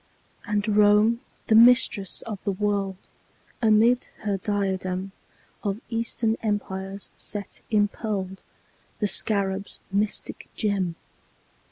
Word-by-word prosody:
And 210 +1 0
Rome, 210 +2 +4 0.3
the - - +2
Mistress 230 -4 +5
of 215 -4 -7
the 200 - 0
World, 200 -1 -1 0.6
Amid 230 +2 +4 0.2
her 205 -2 -1
diadem 190 -1 -2 0.5
Of 200 0 -2
Eastern 230 -1 0
Empires 195 -2 -3
set 205 -2 -6
impearled 205 -2 -1 0.6
The 210 - 0
Scarab's 200 -1 +1
mystic 205 +2 -1
gem. 195 -6 -1
205 Hz, 95 wpm, -25 LUFS, 195-215 Hz, 0.6 s, Mistress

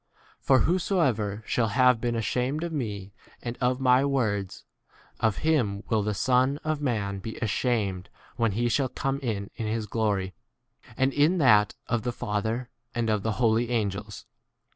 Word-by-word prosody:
For 130 -1 +4
whosoever 135 - +1
shall 115 -2 +1
have 125 +2 +3
been 120 -1 -1
ashamed 125 +7 -1
of 170 -1 -4
me 100 -8 -4 0.3
and 120 0 -4
of 125 +1 +1
my 130 0 +4
words, 110 -9 -1 0.6
of 110 -3 +1
him 115 -11 +1
will 110 -1 +2
the 105 0 -1
Son 130 +5 +2
of 155 -1 -1
man 105 -7 -1
be 110 +3 -6
ashamed 105 -4 -1 0.3
when 115 -4 +1
he 120 +4 0
shall 130 +3 +1
come 135 +1 -2
in 105 -7 -3
his 110 -1 -2
glory, 100 -4 -1 0.6
and 135 0 +2
[in 155 +6 +3
that] 105 - +4
of 120 -1 -1
the 125 - -2
Father, 115 +2 -3 0.2
and 115 -2 0
of 105 -1 +1
the 110 - -1
2? - - -9
holy 115 -1 +2
angels. 105 -3 -3
115 Hz, 165 wpm, -27 LUFS, 105-130 Hz, 0.6 s, For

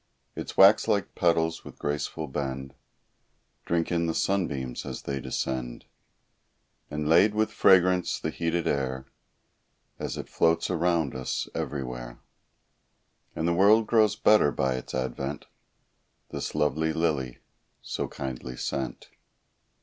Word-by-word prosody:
Its - - -6
wax 100 +4 +7
like 100 -5 0
petals 80 -1 +1
with - - -12
graceful 75 +2 -3
bend, 65 -1 -4 0.9
Drink 85 0 0
in 85 -1 +1
the 80 - -1
sunbeams 70 -10 -1
as - - -6
they 70 -1 -3
descend; 65 -2 -3 1.0
And 75 0 -3
lade 95 +7 +5
with 110 0 +1
fragrance 90 -1 +4
the 80 - -3
heated 85 0 -1
air 65 -3 -1 0.9
As - - -4
it - - -6
floats 80 +1 +1
around 85 -4 +1
us 65 -1 -3
everywhere; 60 -4 -5 1.2
And 80 - -1
the 85 - +2
world 105 +5 +5
grows 110 -2 +3
better 105 -10 +4
by 65 -2 0
its 65 0 -6
advent, 70 +2 -3 0.9
This - - -4
lovely 75 +1 +1
lily, 75 -7 -1 0.5
so - - -3
kindly 65 -1 -6
sent. 70 -1 -4
80 Hz, 125 wpm, -27 LUFS, 65-85 Hz, 1.2 s, wax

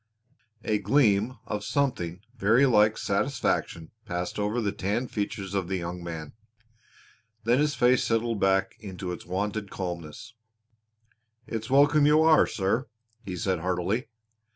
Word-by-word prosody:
A 110 -2 0
gleam 115 -3 +2
of 105 0 -4
something 100 -9 -1
very 115 +5 +4
like 110 -3 +4
satisfaction 100 - -1
passed 90 +3 -4
over 105 +3 0
the 105 -4 0
tanned 105 +5 -2
features 100 -2 -4
of 95 -3 -1
the 95 +1 -1
young 85 0 -5
man. 80 -3 -6 1.1
Then 120 +4 +3
his 150 -1 +1
face 125 -1 +3
settled 115 -1 0
back 95 0 +2
into 95 -3 -6
its 90 - -8
wonted 100 +2 -2
calmness. 90 +2 -6 1.1
"It's 110 -1 -5
welcome 145 +2 +5
you 155 +1 +5
are, 160 -1 +5
sir," 110 +6 -1 0.4
he 95 -4 -5
said 95 0 -1
heartily. 90 +7 -1
105 Hz, 135 wpm, -27 LUFS, 95-120 Hz, 1.1 s, welcome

